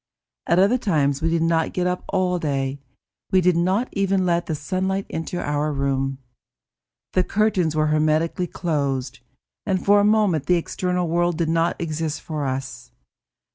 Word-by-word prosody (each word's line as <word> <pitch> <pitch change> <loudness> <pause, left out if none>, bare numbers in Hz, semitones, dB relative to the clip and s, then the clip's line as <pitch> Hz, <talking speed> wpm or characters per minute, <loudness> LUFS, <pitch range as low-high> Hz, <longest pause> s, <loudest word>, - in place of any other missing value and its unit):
At 170 - +3
other 205 +7 +4
times 145 - +1
we 165 - +1
did 165 0 +1
not 165 -1 +1
get 180 - -1
up 180 0 -1
all 185 -2 +1
day; 140 -3 -2 0.5
we 190 - +4
did 180 -1 +3
not 190 +8 +1
even 195 -1 +1
let 170 -1 +1
the 160 - -1
sunlight 190 +6 -2
enter 165 +2 -4
our 150 +1 -1
room. 135 -1 -1 1.0
The 185 - +3
curtains 190 -6 +1
were 155 0 +2
hermetically 155 +3 +1
closed, 140 -7 -2 0.4
and 190 -3 -1
for 205 +1 +6
a - - +3
moment 205 -9 +2
the 180 - +4
external 180 +1 -2
world 175 0 +1
did 165 -2 0
not 165 +1 +1
exist 160 -1 -3
for 155 -4 -4
us. 130 - -5
170 Hz, 165 wpm, -22 LUFS, 150-185 Hz, 1.0 s, for